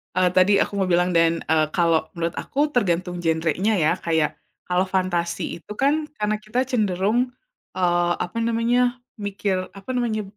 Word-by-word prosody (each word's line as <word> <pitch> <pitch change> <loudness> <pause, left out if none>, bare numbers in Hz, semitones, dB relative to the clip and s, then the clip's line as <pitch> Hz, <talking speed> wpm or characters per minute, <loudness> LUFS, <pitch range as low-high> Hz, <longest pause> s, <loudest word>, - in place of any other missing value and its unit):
Eee, 185 0 +3
tadi 185 +3 +4
aku - - -1
mau 195 - +2
bilang 180 0 +2
dan, 165 -1 +2
eee, 155 -1 +4
kalau 165 -3 +2
menurut 170 0 -3
aku 290 +2 0
tergantung 180 - 0
genrenya 165 +5 +1
ya 155 - +4
kayak, 160 -3 0 0.3
kalau 180 +1 +2
fantasi 185 -2 -1 0.2
itu 170 - -14
kan 300 +3 +2
karena 210 0 0
kita 215 +4 -3
cenderung, 210 -2 +1 0.6
eee, 175 -1 +2
apa 180 +6 -7
namanya, 245 +2 +1 0.2
mikir, 200 -1 -1 0.2
apa 195 +5 -13
namanya, 230 -3 0
185 Hz, 155 wpm, -23 LUFS, 170-215 Hz, 0.6 s, tadi